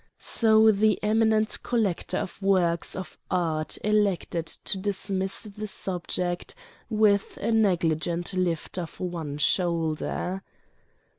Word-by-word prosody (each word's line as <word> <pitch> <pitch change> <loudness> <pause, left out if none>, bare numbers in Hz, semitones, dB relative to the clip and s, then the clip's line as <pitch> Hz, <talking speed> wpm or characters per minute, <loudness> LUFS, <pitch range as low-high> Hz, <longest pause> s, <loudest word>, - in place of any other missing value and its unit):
So 220 -1 +5
the 215 +1 +3
eminent 220 0 +2
collector 220 -8 -1
of 190 - -5
works 180 -4 +2
of 185 -4 -7
art 160 -4 -1
elected 200 -5 +1
to 195 - -3
dismiss 195 -1 -1
the 215 0 -7
subject 180 -2 -2 0.3
with 210 -3 +2
a - - -1
negligent 175 -4 +1
lift 180 -1 -1
of 170 -2 -7
one 165 -5 -4
shoulder. 170 +3 0
190 Hz, 105 wpm, -26 LUFS, 170-210 Hz, 0.3 s, So